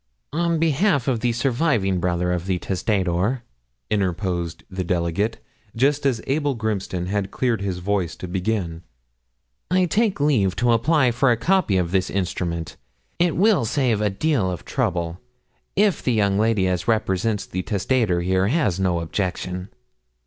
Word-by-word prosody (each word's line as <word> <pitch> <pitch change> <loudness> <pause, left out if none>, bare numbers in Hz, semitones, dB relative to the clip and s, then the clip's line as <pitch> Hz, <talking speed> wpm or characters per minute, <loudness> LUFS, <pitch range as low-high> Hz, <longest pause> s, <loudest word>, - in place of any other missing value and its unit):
'On 170 +1 +1
behalf 160 - +2
of 125 -4 +1
the 120 +1 +1
surviving 120 - +1
brother 90 0 0
of 90 0 -2
the 95 -2 +1
testator,' 95 +5 0 0.5
interposed 90 -4 -1
the 95 -1 -4
delegate, 90 +5 -1 0.4
just 140 +4 +2
as 120 -5 -1
Abel 145 0 0
Grimston 100 -5 -2
had 100 +1 -1
cleared 120 -4 0
his 95 -2 -2
voice 90 -3 -1
to 90 - -7
begin, 90 -2 -2 0.9
'I 185 +1 +3
take 205 +2 +1
leave 120 -11 +2
to 120 -1 +2
apply 130 +3 +3
for 125 +3 +2
a 120 - +3
copy 170 - +2
of 85 -2 0
this 95 0 +1
instrument. 85 -3 -3 0.4
It 175 -2 +2
will 200 - +4
save 115 -2 +1
a 105 - +2
deal 110 -1 0
of 90 -3 -5
trouble, 85 0 -1 0.6
if 205 -1 +3
the 125 - +1
young 100 -2 +2
lady 110 -4 +2
as 90 +2 -1
represents 110 -1 0
the 95 - -3
testator 100 -2 0
here 95 +2 +1
has 110 - +1
no 90 -3 +1
objection.' 90 +1 -3
100 Hz, 155 wpm, -23 LUFS, 90-130 Hz, 0.9 s, will